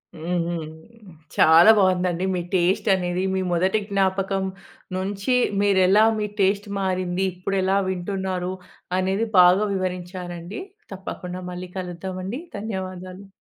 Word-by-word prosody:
హ్మ్. 170 +3 -3
హ్మ్. 165 -3 -3 0.7
చాలా 165 +7 +8
బాగుందండి. 185 -2 +2
మీ 175 - -1
టేస్ట్ 185 +4 +2
అనేది 180 0 -1
మీ 190 - 0
మొదటి 185 +5 +2
జ్ఞాపకం 195 0 0 0.5
నుంచి 200 +6 -1 0.3
మీరెలా 195 +1 +4 0.2
మీ 210 - -1
టేస్ట్ 200 +2 +2
మారింది? 185 -1 -1
ఇప్పుడెలా 190 +1 0
వింటున్నారు 185 0 -3 0.4
అనేది 190 +4 0
బాగా 180 +3 +6
వివరించానండి. 180 - -5 0.3
తప్పకుండా 185 -1 -6
మళ్ళీ 180 0 -7
కలుద్దామండి. 185 +5 -5 0.2
ధన్యవాదాలు. 185 -2 -6
185 Hz, 105 wpm, -23 LUFS, 180-195 Hz, 0.7 s, చాలా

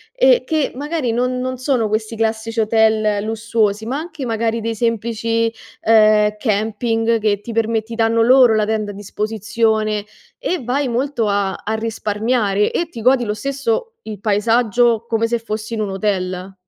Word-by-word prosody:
e - - +4
che 310 -3 0
magari 290 -2 -2
non 250 +2 0
non 255 0 -3
sono 255 -4 0
questi 215 +1 -2
classici 225 0 -1
hotel 215 -1 +2
lussuosi 220 -1 -1
ma 260 +4 -2
anche 315 -3 -6
magari 230 0 -1
dei 230 +1 -2
semplici, 230 0 0 0.3
ehm, 215 -1 +4
camping 225 +1 0
che 205 -2 0
ti 230 - -7
perme 225 0 0
ti 230 +1 -8
danno 225 0 +2
loro 245 -1 +6
la 215 -1 +2
tenda 215 -1 -2
a - - -10
disposizione 215 +1 -1 0.3
e 365 - -2
vai 260 +3 0
molto 245 -1 -1
a 200 -1 0
a 220 - -1
risparmiare 220 -1 0
e 340 - -1
ti 245 -9 -9
godi 250 +1 +3
lo 210 - -1
stesso 275 - -2
il 210 -2 -8
paesaggio 230 +2 +2
come 230 -1 0
se 235 +1 0
fossi 220 0 -5
in 220 - -2
un 210 - -2
hotel. 190 -1 -2
225 Hz, 165 wpm, -19 LUFS, 215-240 Hz, 0.3 s, loro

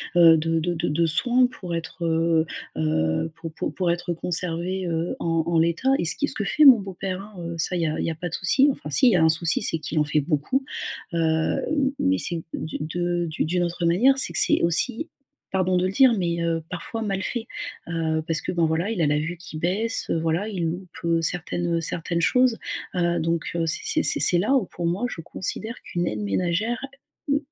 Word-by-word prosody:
heu, 165 -2 +7
de 165 +1 0
de 175 +2 -1
de 160 - -2
de 165 +3 +1
soin 245 +11 +2
pour 180 -8 -6
être, 165 +1 -5
heu 165 0 +2 0.3
heu, 80 - 0
pour 165 0 -8
pour - - -4
pour 180 -2 +1
être 175 0 -2
conservée, 180 +2 -2
heu, 165 0 -2
en 165 -1 0
en 170 -1 +2
l'état. 170 +11 +1
Et 170 - 0
ce - - +6
qui 290 - -1
ce - - 0
que 205 - -2
fait 305 - +2
mon 255 -5 +9
beau-père 190 -1 -5
hein, 205 +1 -13
heu, 170 -1 -5
ça 165 +3 0
il 175 - -1
y - - +1
a 155 - -2
il - - -1
y - - -1
a 160 - -6
pas 175 +2 -5
de - - -13
souci 265 +10 +3
enfin 150 - -8
s'il 200 - +5
y 185 - +3
a 160 - +3
un 160 - +5
souci, 165 +1 +1
c'est 165 - 0
qu'il 155 +1 -2
en 150 - +2
fait 150 0 +1
beaucoup. 155 - -1 0.5
Heu, 170 - -1
m 165 - 0
mais 280 0 +2
c'est 170 -2 0
du 155 - -4
de 175 +2 -2
d'u 155 - -2
d'une 175 +2 0
autre 175 0 -2
manière, 240 +11 +4
c'est - - +4
que - - +4
c'est - - +4
aussi, 230 - +1 0.4
pardon 185 -1 +1
de 180 - +1
le 185 - -3
dire, 260 +3 +6
mais, 170 -2 -1
heu, 165 -1 0
parfois 205 +5 -5
mal 195 -2 -2
fait, 230 +3 -3 0.4
heu, 160 -1 -1
parce 160 -3 0
que - - -3
ben 170 -2 +2
voilà, 165 +7 -1
il 200 - -2
a 155 - +3
la 150 0 +2
vue 165 +3 -4
qui 165 -2 -9
baisse, 195 +8 0
heu, 165 - +1
voilà, 165 +6 -1
il 180 -5 -3
loupe, 180 +2 -5 0.2
heu, 165 0 +2
certaines, 175 +1 -1
heu, 165 - -2
certaines 170 +1 -1
choses, 250 +5 +3 0.4
heu, 175 -1 +1
donc, 165 +1 -1
heu, 165 -1 0
c'est 160 - +1
c'est - - +2
c'est - - +6
c'est 175 - +7
là 215 +9 +1
où 235 -8 +2
pour 175 - -6
moi 185 +8 -1
je 165 - -7
considère 220 +7 -5
qu'une 175 0 -3
aide 105 - -3
ménagère, 180 - -1 0.5
mmh, 280 - +3
170 Hz, 240 wpm, -24 LUFS, 165-190 Hz, 0.5 s, mon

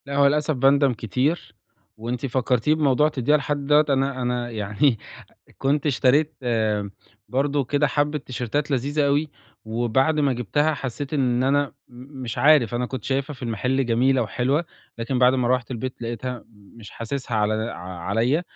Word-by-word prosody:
لا 140 0 -5
هو 140 0 +5
للأسف 150 +2 +1
باندم 135 +1 +4
كتير، 125 - -2 0.4
وأنتِ 120 +4 -4
فكرتيني 130 +2 +1
بموضوع 150 -1 +3
تدّيها 150 0 +2
لحد 145 0 -3
دوّة، 150 +1 +5
أنا 135 -1 0
أنا 125 -1 -1
يعني 110 +3 0 0.6
كنت 140 +2 0
اشتريت 145 +2 +2 0.9
برضو 140 +2 0
كده 145 +3 +1
حبة 145 +1 0
تيشرتات 130 +2 -3
لذيذة 140 +3 +1
أوي، 145 +2 +1 0.3
وبعد 120 +7 +1
ما 140 -2 +2
جبتها 145 +6 0
حسيت 135 +2 -5
إن 125 -3 +1
أنا 140 +1 +1 0.2
م 130 +2 -11
مش 115 -3 -5
عارف 140 -6 +5
أنا 125 +1 -1
كنت 130 -3 -6
شايفها 140 +2 -1
في 130 - -15
المحل 125 +3 -1
جميلة 125 +2 +2
وحلوة، 130 +8 0 0.3
لكن 120 +3 -2
بعد 125 +1 +5
ما 125 -2 0
روّحت 125 0 0
البيت 125 +1 -5
لقيتها 120 +1 -5
مش 105 0 -15
حاسسها 120 0 -4
على 105 0 +1
د 110 +1 -2
ع - - -7 0.2
عليَّ، 115 - 0
130 Hz, 160 wpm, -23 LUFS, 120-145 Hz, 0.9 s, هو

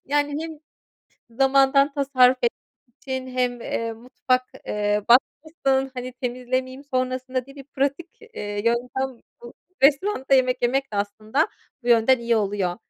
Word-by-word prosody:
Yani, 290 +2 0
hem 320 -2 -7 0.7
zamandan 270 +2 +4
tasarruf 260 -3 +4
etmek 235 - +2 0.5
için 260 -1 -4
hem, 250 -1 -1
eee, 230 0 -3
mutfak, 255 +2 -1 0.2
eee, 210 0 0
batmasın, 270 +1 +2
hani, 250 0 -5
temizlemeyeyim 255 +2 -3
sonrasında 255 0 -1
diye 275 +1 -15
bir 275 - -10
pratik, 280 +5 -2
eee, 205 - -6
yöntem 250 +2 -1 0.2
bu 240 - -10 0.3
restoranda 280 0 +3
yemek 255 -1 +2
yemek 265 0 0
de, - - -3
aslında, 215 - -1 0.3
bu 240 - -5
yönden 240 +2 +5
iyi 235 -1 +1
oluyor. 195 -4 -1
255 Hz, 135 wpm, -23 LUFS, 240-275 Hz, 0.7 s, yönden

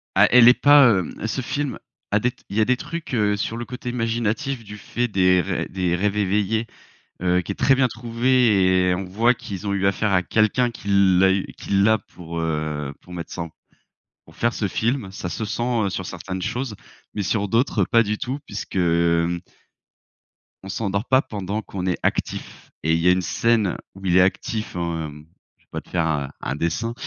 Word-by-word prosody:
Ah, - - +6
elle 120 -1 +8
est 125 - +9
pas, 140 -8 +7
hem 85 - -5
ce 130 - -2
film 145 +2 -3 0.3
a 105 - +3
des 125 +3 +1
t 125 - -27
il 100 - -4
y - - +4
a - - +4
des 130 +1 +2
trucs, 165 +2 -6
heu, 105 -3 +2
sur 115 +3 -3
le 120 - -4
côté 125 0 -6
imaginatif 120 +2 -1
du 105 0 -9
fait 120 +4 -2
des 90 -3 +3
rê - - -2
des 90 -2 0
rêves 105 +3 0
éveillés, 105 +3 +1 0.6
heu, 90 0 +2
qui - - -8
est - - -6
très 135 - +4
bien 130 -1 +3
trouvé 115 -6 +2
et - - +3
on 95 +2 -3
voit 115 +7 +2
qu'ils 100 -3 -7
ont 100 - 0
eu 100 -1 -1
affaire 100 +1 +1
à 90 -1 +3
quelqu'un 115 +5 +2
qui 110 - -10 0.3
l'a 95 0 +5
eu 95 - 0
qui - - -9
l'a 105 +3 +4
pour, 85 -3 -9
heu, 75 -3 -2
pour 90 - -14
mettre 85 -1 -7
ça 85 - -4
en 85 - -7 0.7
pour - - -19
faire 120 0 +1
ce 105 - -1
film. 115 +1 -1
Ça 95 -2 -5
se 110 - -3
sent, 110 - -3
heu, 120 -5 +1
sur 95 0 -4
certaines 95 +1 -6
choses, 120 +4 -3 0.4
mais 105 - -2
sur 100 +2 0
d'autres 115 -3 +2
pas 115 +6 +4
du 105 0 -2
tout 130 +6 -4
puisque, 105 -1 -7
hem 85 0 +2 1.2
on - - -9
s'endort 100 +1 -2
pas 130 0 +4
pendant 105 -1 -4
qu'on 95 -3 -6
est 90 - 0
actif. - - -3
Et 80 - +2
il 80 - +2
y 85 - +1
a - - +7
une 90 0 +2
scène 110 +1 +1 0.2
où 95 - -10
il 90 -1 +3
est 90 - +7
actif, 105 +3 -1
hem- 80 -4 -4 0.3
je - - -33
vais - - -53
pas - - -4
te - - -23
faire 85 -2 0
un 70 -3 -1
un 65 - -3
dessin- 85 +10 -2
100 Hz, 215 wpm, -22 LUFS, 90-115 Hz, 1.2 s, est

